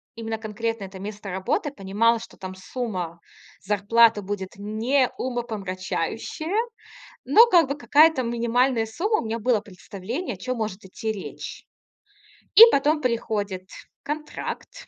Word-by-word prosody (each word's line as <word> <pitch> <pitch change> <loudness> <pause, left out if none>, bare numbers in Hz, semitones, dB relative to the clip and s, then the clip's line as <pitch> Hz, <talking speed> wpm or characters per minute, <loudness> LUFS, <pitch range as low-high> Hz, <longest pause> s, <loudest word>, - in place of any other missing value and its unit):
именно 225 -1 -4
конкретно 225 0 -3
это 190 0 -10
место 205 0 -7
работы, 270 - -1
понимала, 225 +2 +1
что - - -12
там 185 0 -7
сумма 185 -4 -5 0.4
зарплаты 210 +2 +4
будет 190 -1 -5
не 225 +6 +1
умопомрачающая. 225 - -3 0.7
Но 460 +2 +7
как 345 - +4
бы 280 - -1
какая-то 300 -1 +4
минимальная 235 0 +1
сумма- 370 - 0
у - - -7
меня 225 +1 -2
было 230 -1 +2
представление, 210 - -6
о 180 - -14
чём 255 +5 -3
может 210 -3 -4
идти 220 +4 -5
речь. 200 -3 -8 0.9
И - - +9
потом 300 +2 +2
приходит 205 -6 -2 0.3
контракт. 300 - -6
225 Hz, 130 wpm, -24 LUFS, 200-255 Hz, 0.9 s, И